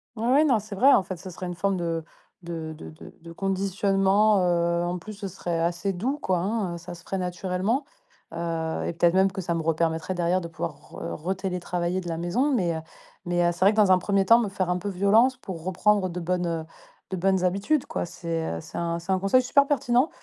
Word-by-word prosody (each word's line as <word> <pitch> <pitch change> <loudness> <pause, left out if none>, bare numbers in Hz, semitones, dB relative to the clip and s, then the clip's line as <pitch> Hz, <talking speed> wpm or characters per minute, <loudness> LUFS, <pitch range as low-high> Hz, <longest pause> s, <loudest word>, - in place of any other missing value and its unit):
Ouais, 225 - -5
ouais, 285 +3 +6
non, 260 -6 +4
c'est 210 0 -8
vrai. 270 +8 +6
En - - +4
fait, 185 -1 -6
ce 185 - -9
serait 185 +1 -7
une 175 - -5
forme 195 +2 0
de 165 -2 -2 0.4
de 165 -2 -5
de 155 - -10 0.3
de 170 0 -11
conditionnement, 195 +2 +2
heu, 170 -1 +1
en 175 +1 -2
plus, 215 +5 -9
ce 200 -1 -6
serait 175 -2 -3
assez 170 +4 0
doux, 245 +11 -2
quoi, 185 -11 0
hein, 190 -2 -1
ça 175 +1 -9
se 170 - -15
ferait 195 - -3
naturellement. 185 - -1 0.5
Heu 165 -1 -2
et - - -2
peut-être 170 +1 +3
même 190 +1 +4
que 190 0 -4
ça 170 -1 -2
me 165 - -1
re-permettrait 165 +2 0
derrière 175 +1 +1
de 170 - -5
pouvoir 165 - -5
re 85 - -6
re-télétravailler 180 -1 -2
de 175 - -6
la 165 - -2
maison. 215 - 0
Mais 175 -9 +1
heu 160 - -4 0.4
mais 175 0 +1
heu, - - +2
c'est 175 - -9
vrai 195 +2 +6
que, 215 - -5
dans 205 -3 +5
un 185 - +6
premier 195 +1 +1
temps, 230 +4 +7
me 225 -4 -1
faire 190 -2 -2
un 180 - +1
peu 195 +3 -4
violence 210 +7 +3
pour 185 -9 -8
reprendre 190 +2 +2
de 180 +1 -5
bonnes 170 -2 -1 0.4
de 190 - -3
bonnes 190 +1 +2
habitudes, 200 +11 +1
quoi. 310 - -3
C'est, 165 -1 -4
heu, - - -5
c'est - - -9
un 170 0 -1
c'est 170 +3 -4
un 190 - +2
conseil 195 +7 +4
super 280 +3 +4
pertinent. 260 0 +2
185 Hz, 230 wpm, -26 LUFS, 170-200 Hz, 0.5 s, temps